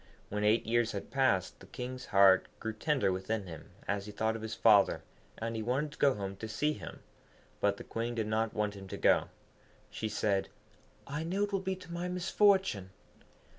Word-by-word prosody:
When 105 +1 -2
eight 110 +2 +3
years 115 +1 +1
had 100 - -6
passed, 130 -9 +1
the - - -14
King's 125 +1 -6
heart 95 -1 +6
grew 110 - -3
tender 130 -2 +1
within 95 +3 -2
him 80 -4 -10 0.2
as 100 0 -1
he - - -6
thought 110 +2 0
of 115 - -6
his 110 0 -4
father, 100 -2 +5 0.3
and 115 +1 -3
he 110 - -2
wanted 130 +6 -1
to 150 - -14
go 140 -2 +4
home 100 -1 -5
to 110 - -6
see 150 +8 0
him. - - -9 0.6
But 100 0 +2
the - - -8
Queen 115 +1 -3
did 110 -2 -1
not 110 +1 -1
want 105 -1 0
him 100 -1 -10
to - - -6
go. - - +4 0.6
She 110 - -3
said, 100 -2 0 0.6
'I 150 +3 -4
know 190 +4 0
it 205 - -1
will 195 - +2
be 190 0 -2
to 180 -2 -11
my 175 +1 -3
misfortune.' 180 - +2
110 Hz, 205 wpm, -32 LUFS, 100-140 Hz, 0.6 s, heart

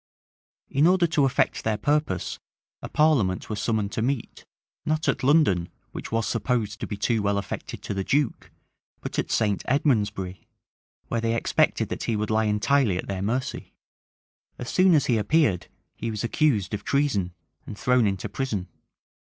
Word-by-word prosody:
In 145 +4 +4
order 180 -1 +4
to 155 -4 +2
effect 135 - +1
their 110 -1 0
purpose, 145 - -1 0.4
a - - -6
parliament 125 -13 +2
was 105 - -3
summoned 110 -3 0
to - - -2
meet, 125 0 -2 0.4
not 155 0 -1
at - - +1
London, 130 - +3 0.2
which - - -7
was 115 -1 0
supposed 115 -1 -1
to - - -4
be 105 - -5
too 115 0 +1
well 100 0 +1
affected 100 - -5
to - - -3
the 95 0 -2
duke, 140 +2 0 0.5
but - - -4
at - - -2
St. 105 -3 +1
Edmondsbury, 105 -9 0 0.6
where 115 - -1
they 115 0 0
expected 115 - +1
that - - -4
he 115 - 0
would 105 +1 -2
lie 110 0 +2
entirely 105 0 +2
at - - -4
their 95 -1 -4
mercy. 125 +7 -3 0.8
As 125 - -5
soon 185 -2 +5
as 145 - +3
he 115 -3 +2
appeared, 110 - +2 0.3
he 115 - -4
was 110 0 -3
accused 115 -6 +1
of 105 0 -3
treason, 105 -12 0 0.3
and 105 - -7
thrown 125 -1 +3
into 95 -2 -2
prison. 110 -9 -3
115 Hz, 170 wpm, -25 LUFS, 100-140 Hz, 0.8 s, soon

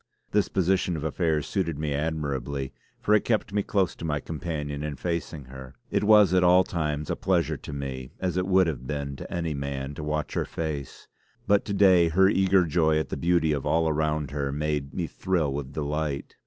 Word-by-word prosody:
This 105 -1 +2
position 95 -2 +1
of 75 - -5
affairs 80 -1 0
suited 85 -6 -1
me 75 -1 -2
admirably, 70 -3 -2 0.3
for 105 - +1
it 105 - +4
kept 110 -3 0
me 105 - +2
close 95 -3 0
to - - -9
my 75 -3 -1
companion 75 -2 -4
and 75 -2 -4
facing 85 -3 -3
her. 65 +1 -11 0.2
It - - +1
was 105 -3 +6
at 90 -1 +4
all 90 +1 +6
times 75 -4 -2
a - - 0
pleasure 90 -3 +1
to - - -9
me 65 -2 -5
as 90 -2 -1
it 90 0 0
would 95 -1 +5
have 65 -6 -4
been 70 -1 -3
to - - -9
any 85 -3 -2
man, 70 0 -4
to 75 +1 -7
watch 75 0 -2
her - - 0
face; 75 -4 -5 0.4
but 100 0 +3
to 100 - -3
day 95 -4 +6
her 95 +4 +5
eager 95 -2 +3
joy 80 -1 +2
at 80 - -1
the - - -3
beauty 85 -2 +2
of 70 -2 -1
all 80 +2 +2
around 75 -2 0
her 70 -1 -2
made 75 -1 -2
me 90 - -2
thrill 85 -5 -1
with 70 -1 -4
delight. 75 -1 -3
80 Hz, 210 wpm, -26 LUFS, 70-90 Hz, 0.4 s, was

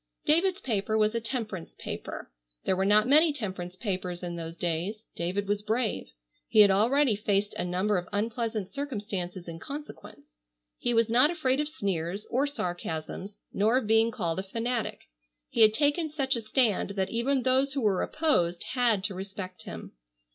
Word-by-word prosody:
David's 360 +5 +3
paper 215 -2 0
was 215 0 +3
a 230 - -1
temperance 220 -7 -4
paper. - - -6 0.3
There 190 - +2
were 190 +1 +1
not 210 +2 +5
many 305 +4 +6
temperance 185 -9 -5
papers 185 -3 -3
in 175 -1 -4
those 165 0 -6
days. 175 +7 -2
David 185 +4 -2
was 205 0 0
brave. 220 +2 -1 0.4
He 215 - +6
had 200 -1 +7
already 235 +5 +3
faced 205 0 0
a - - -3
number 185 +3 +1
of 175 - -10
unpleasant 220 -1 -1
circumstances 200 -10 -4
in 165 -1 -7
consequence. 290 - -9 0.5
He 245 - 0
was 230 -1 +4
not 245 +6 +5
afraid 280 -6 0
of 300 0 0
sneers 195 - -2
or 270 +4 +2
sarcasms, 180 - -4 0.2
nor 220 +5 +3
of 260 - 0
being 225 +1 +4
called 180 -6 -2
a - - -2
fanatic. 230 +3 -2 0.5
He - - 0
had 215 -1 +8
taken 295 +7 +1
such 275 -3 0
a 235 - -2
stand 220 -3 +1
that 190 -1 -1
even 255 +3 +1
those 265 +1 +2
who 275 - -1
were 205 -5 +2
opposed 175 - +1
had 235 -6 +2
to 205 - -1
respect 190 -1 -7
him. 85 -1 -8
215 Hz, 175 wpm, -28 LUFS, 185-255 Hz, 0.5 s, had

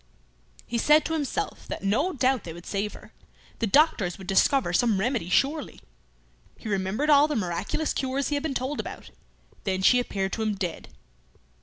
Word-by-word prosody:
He 235 - -2
said 300 +5 +5
to 325 - -2
himself 320 +7 -3
that - - -6
no 250 - +1
doubt 260 - +1
they 165 - -7
would 170 +1 -12
save 205 +1 -2
her; - - -14 0.5
the 230 - 0
doctors 210 - +3
would 190 - -10
discover 195 +2 +2
some 215 +1 +2
remedy 225 -4 -1
surely. 280 +9 0 0.8
He - - -9
remembered 205 +9 0
all 290 +1 +6
the 300 - -2
miraculous 190 - -2
cures 265 +1 -1
he 295 - 0
had 285 - -1
been 295 -3 -3
told 260 +4 -2
about. - - -7 0.5
Then 190 -1 -1
she 250 +5 +6
appeared 195 -5 -2
to 225 - -2
him 215 -1 0
dead. 185 -3 -4
240 Hz, 180 wpm, -26 LUFS, 195-285 Hz, 0.8 s, all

